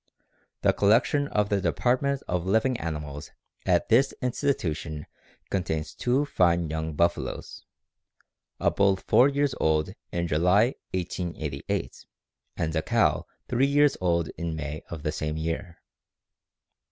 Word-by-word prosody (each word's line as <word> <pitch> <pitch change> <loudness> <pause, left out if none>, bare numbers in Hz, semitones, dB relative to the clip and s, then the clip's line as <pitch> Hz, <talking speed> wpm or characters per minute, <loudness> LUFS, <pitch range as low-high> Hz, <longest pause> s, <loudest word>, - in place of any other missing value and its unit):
_ - - -59
The - - +4
collection 120 +8 +3
of 105 -6 0
the 100 -1 +1
department 130 +6 +1
of 90 -1 -1
living 110 +6 +2
animals 75 -3 -5 0.4
at - - +2
this 130 +4 +4
institution 85 - -2 0.5
contains 80 -5 -2
two 130 +4 +1
fine 85 - +2
young 80 -1 -3
buffaloes; 85 +2 -1 0.9
a - - +2
bull 100 -1 +3
four 125 +7 +4
years 140 -1 +1
old 80 -1 +1 0.2
in 85 0 -1
July, 90 - +3 0.2
1888, 85 -6 -4 0.5
and 80 +1 -1
a 80 - +2
cow - - +1 0.2
three 130 +3 +2
years 145 +1 +4
old 85 -3 +1
in 85 -1 -2
May 75 0 -5
of 80 -3 -7
the 75 - 0
same 75 0 -3
year. 85 +2 -3
85 Hz, 130 wpm, -27 LUFS, 80-120 Hz, 0.9 s, The